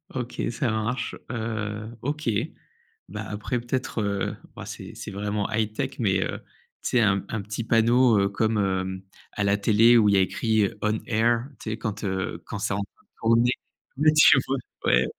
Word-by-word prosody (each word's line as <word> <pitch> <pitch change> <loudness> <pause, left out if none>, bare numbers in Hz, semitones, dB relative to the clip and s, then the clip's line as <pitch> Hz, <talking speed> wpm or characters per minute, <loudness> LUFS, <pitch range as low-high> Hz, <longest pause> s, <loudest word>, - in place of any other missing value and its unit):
OK 125 -1 -4
ça 120 -1 -1
marche. 110 +3 -2 0.2
Heu, 110 -2 -3
OK, 145 -1 -2 0.8
bah 105 +2 -5
après 105 +4 -2
peut-être, 120 -1 -2
heu, 100 -1 -1 0.2
bah - - -8
c'est - - -8
c'est - - -7
vraiment 105 +1 -2
high-tech 110 +4 -1
mais, 95 -4 +2
heu, - - -4 0.4
tu - - -1
sais 125 - +4
un 100 -2 +2
un 110 -2 -2
petit 105 +3 -4
panneau, 115 0 +4
heu, 100 0 +2
comme, 110 +2 0
hem, 95 -1 -1 0.3
à 105 - -1
la 100 0 +3
télé 115 +3 +5
où 105 -2 +5
il 100 - +4
y - - +5
a - - +5
écrit 110 +1 +1
«On 110 0 +1
Air», 115 +2 +2
tu 110 - -5
sais 110 - -3
quand, 110 -1 -4
heu, 95 -3 -2
quand 105 - -5
c'est 100 - -1
en - - -1
train 100 0 -7
de - - -43
tourner. 115 +2 +4 0.5
Ouais 155 +1 +5
tu 150 -2 +7
vois? 135 +1 0 0.3
Ouais. 60 +1 +4
110 Hz, 195 wpm, -25 LUFS, 100-120 Hz, 0.8 s, tu